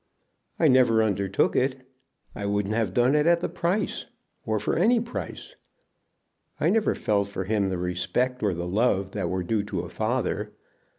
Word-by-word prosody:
"I 165 - +4
never 125 -4 +5
undertook 100 -2 +1
it. 130 0 0 0.5
I 100 - -4
wouldn't 100 0 0
have 110 -4 0
done 120 +6 +3
it 150 +1 +3
at 170 0 +5
the - - -2
price, 180 +4 -2 0.4
or 110 0 +1
for 105 - -1
any 230 +8 +4
price. 235 +2 -6 1.0
I - - +2
never 225 -1 +2
felt 100 -2 0
for 100 -1 -4
him 100 0 0
the 95 - -2
respect 90 +9 -1
or 100 -4 +1
the 85 +1 -4
love 95 -1 +1
that 95 -4 -2
were 95 0 -1
due 105 +4 0
to 95 -4 -3
a 90 - -8
father. 110 -1 -2
110 Hz, 175 wpm, -26 LUFS, 95-130 Hz, 1.0 s, never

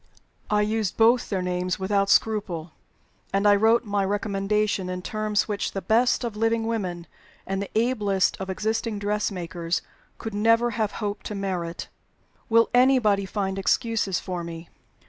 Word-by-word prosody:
I 210 0 +3
used 215 -2 -1
both 230 +2 +4
their 190 -3 -1
names 180 0 -1
without 200 +1 0
scruple; 185 -6 +1 0.6
and 200 +1 +2
I 205 - +7
wrote 225 +3 +3
my 205 -1 0
recommendation 200 -1 0
in 180 0 -4
terms 215 0 -1
which 205 -2 -2
the 195 - -3
best 235 +7 +2
of 230 -3 -3
living 225 +1 +1
women 185 -7 -3 0.4
and 195 0 -2
the 200 - -5
ablest 210 -5 +1
of 190 - -5
existing 220 +3 -1
dressmakers 185 -5 -2 0.3
could 225 - -6
never 230 +3 +3
have 215 -2 -1
hoped 205 -1 -4
to 210 - -5
merit. 180 -4 -3 0.6
Will 230 0 +4
anybody 245 -6 +4
find 195 -1 -2
excuses 210 -1 +1
for 180 -2 -5
me? 165 0 -8
205 Hz, 150 wpm, -25 LUFS, 190-220 Hz, 0.6 s, I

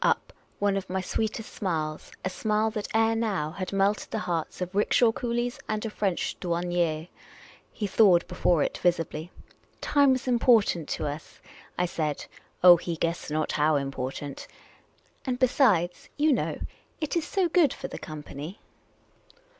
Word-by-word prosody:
Up - - +1 0.2
one 200 -1 +1
of 190 -1 -5
my 190 +1 -1
sweetest 220 +4 -3
smiles 155 -6 -3
— - - -12
a - - +1
smile 215 +2 0
that 215 -2 -4
ere 225 0 +3
now 200 -9 -1
had 185 +2 -5
melted 200 +1 +1
the - - -3
hearts 165 -3 -2
of 180 0 -4
rickshaw 225 +3 +4
coolies 240 +1 -2
and 215 +1 -1
of 220 - -4
French 195 -4 -1
douanicrs. 170 -2 -1 0.6
He 210 - -4
thawed 190 -3 +5
before 175 -3 +2
it - - -3
visibly. 165 -2 0 0.3
" - - -36
Time 285 -2 +4
was 255 0 -3
important 230 - +3
to - - -2
us," 150 +2 -6 0.4
I 180 - +2
said 155 -4 -2 0.2
— - - -34
oh, 175 -1 +10
he 170 0 -4
guessed 165 0 -2
not 155 +1 -1
how 155 +1 +2
important; 135 0 -4 0.4
" - - -37
and 250 -1 0
besides, 220 - +2
you 300 0 +4
know, - - -1 0.4
it 310 0 -2
is 335 - 0
so 380 -3 +1
good 330 -5 +4
for 270 - -6
the - - -8
company 155 +3 -8
185 Hz, 170 wpm, -27 LUFS, 165-225 Hz, 0.6 s, oh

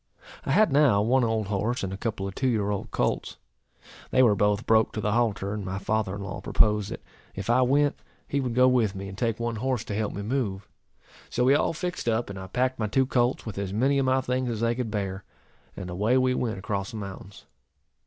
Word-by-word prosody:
I - - +1
had 210 +2 +4
now 135 -9 +4
one 125 +3 +3
old 110 -2 0
horse, 105 +4 -1
and 95 0 -3
a - - -3
couple 100 -2 -3
of 95 - -6
two 130 - -1
year 105 -4 +1
old 100 - -3
colts. - - -1 0.7
They 130 - +4
were 115 -4 +5
both 105 +2 +1
broke 110 -1 +3
to - - -3
the 105 0 0
halter, 105 -3 0
and 105 -1 -4
my 95 0 -4
father 100 0 -1
in 100 - -6
law 100 - -6
proposed, 105 -1 +2
that, - - -7 0.3
if 95 +4 -2
I 125 +2 +4
went, 140 +3 +2 0.3
he 140 - -1
would 125 -4 -2
go 125 +1 +6
with 115 -6 +2
me, 95 0 -6
and 95 - -8
take 115 +1 -1
one 115 -1 -2
horse 125 0 -1
to 105 - -5
help 110 0 -1
me 100 - -5
move. 105 -5 -2 0.6
So 125 - 0
we 130 +2 +5
all 145 - +2
fixed 175 -6 -3
up, 115 -2 0
and 95 - -7
I 95 - -7
packed 125 +6 -1
my 110 - 0
two 130 +5 +2
colts 125 0 +1
with 105 -3 -5
as 100 -1 -3
many 135 +6 +2
of 135 - +1
my 130 0 +3
things 125 0 -1
as 115 -2 -3
they 115 0 +2
could 120 -2 -3
bear; 100 -2 -3 0.5
and 90 - -5
away 105 +8 +1
we 130 0 +3
went 115 -4 -2
across 100 0 -3
the 110 - -7
mountains. 95 -1 -9
110 Hz, 240 wpm, -26 LUFS, 100-125 Hz, 0.7 s, go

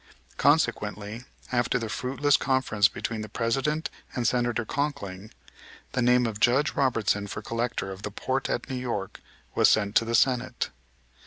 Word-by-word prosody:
Consequently, 105 +4 +1 0.3
after 120 -1 +2
the 115 -2 -3
fruitless 135 +5 +1
conference 130 -8 +3
between 115 -1 -4
the 110 - -6
President 135 +7 -1 0.2
and 120 -2 +1
Senator 120 -2 +1
Conkling, 110 -9 -3 0.6
the 125 - 0
name 125 0 +4
of 110 -2 -3
Judge 135 +6 +3
Robertson 110 -6 +1
for - - -6
Collector 115 -4 -2
of 95 0 -8
the 105 - -4
port 130 +6 -2
at 120 - -2
New 130 -2 -3
York, 105 -6 -4 0.3
was - - +5
sent 100 -2 +2
to - - +4
the 115 +1 -1
Senate. 125 0 +1
120 Hz, 155 wpm, -27 LUFS, 110-130 Hz, 0.6 s, was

